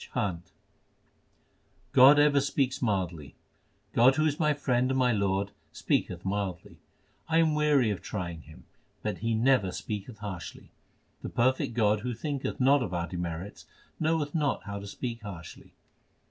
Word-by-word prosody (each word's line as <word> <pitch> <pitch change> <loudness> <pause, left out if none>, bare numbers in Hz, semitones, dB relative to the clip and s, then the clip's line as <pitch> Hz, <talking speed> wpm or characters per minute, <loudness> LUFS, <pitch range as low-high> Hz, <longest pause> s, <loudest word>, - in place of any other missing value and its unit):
CHHANT 90 -4 -2 1.4
God 135 +3 +8
ever 145 -1 +5
speaks 135 -1 -1
mildly: 90 - -2 0.6
God 130 +3 +5
who 155 - +2
is 150 -1 0
my 150 -2 +3
Friend 130 -3 +1
and 130 - 0
my 125 -1 +3
Lord, 100 -2 0 0.2
speaketh - - -1
mildly; 95 -3 -3 0.5
I 165 - +3
am 160 -2 +4
weary 150 -6 +3
of 95 -4 -4
trying 85 -5 -5
Him, 80 0 -15 0.4
but - - -3
He 115 0 0
never 115 -4 +3
speaketh 105 +4 -6
harshly. 100 -5 -8 0.5
The - - -5
perfect 125 -1 +1
God 105 -2 +3
who 120 +2 -4
thinketh 140 +2 -4
not 135 +2 +4
of 90 -7 -3
our 85 -1 -1
demerits, 85 +2 -6 0.3
knoweth 160 -2 0
not 150 -8 0
how 100 -1 -5
to 100 - -8
speak 115 +3 -5
harshly. 90 -6 -10
115 Hz, 150 wpm, -28 LUFS, 95-135 Hz, 1.4 s, God